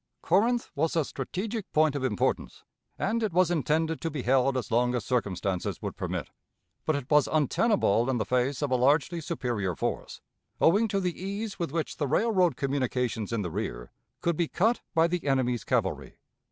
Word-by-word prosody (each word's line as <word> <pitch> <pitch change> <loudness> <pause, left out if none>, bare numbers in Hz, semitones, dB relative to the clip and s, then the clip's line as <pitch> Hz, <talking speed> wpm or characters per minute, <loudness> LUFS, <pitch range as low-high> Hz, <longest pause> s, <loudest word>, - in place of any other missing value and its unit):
Corinth 230 +7 +2
was 160 +3 0
a 160 -3 +2
strategic 200 - -4
point 155 -1 +4
of 140 - -2
importance, 105 -7 -1 0.3
and 225 +4 0
it 215 -3 0
was 180 0 +3
intended 160 +1 0
to 165 - -1
be 145 -5 -4
held 130 +1 +3
as 125 - -4
long 125 +2 +2
as 120 - -2
circumstances 100 -6 -1
would - - -5
permit; - - -4 0.6
but 155 - +2
it 140 -3 -4
was 150 -1 +5
untenable 150 - +2
in 130 - +1
the 110 - -1
face 125 +5 0
of 140 - -1
a - - +4
largely 145 +6 +2
superior 120 - -2
force, - - -3 0.4
owing 205 +7 +4
to 200 -1 0
the 180 -1 -3
ease 200 +2 -4
with 170 -5 -2
which 165 0 -3
the 145 - -1
railroad 185 - +2
communications 125 -5 -1
in 115 -3 -1
the 90 - -4
rear 80 - -4 0.3
could 170 -1 +1
be 170 +1 0
cut 225 +10 +1
by 165 0 +5
the 170 -3 -2
enemy's 125 -5 +1
cavalry. - - -1
145 Hz, 185 wpm, -28 LUFS, 125-175 Hz, 0.6 s, was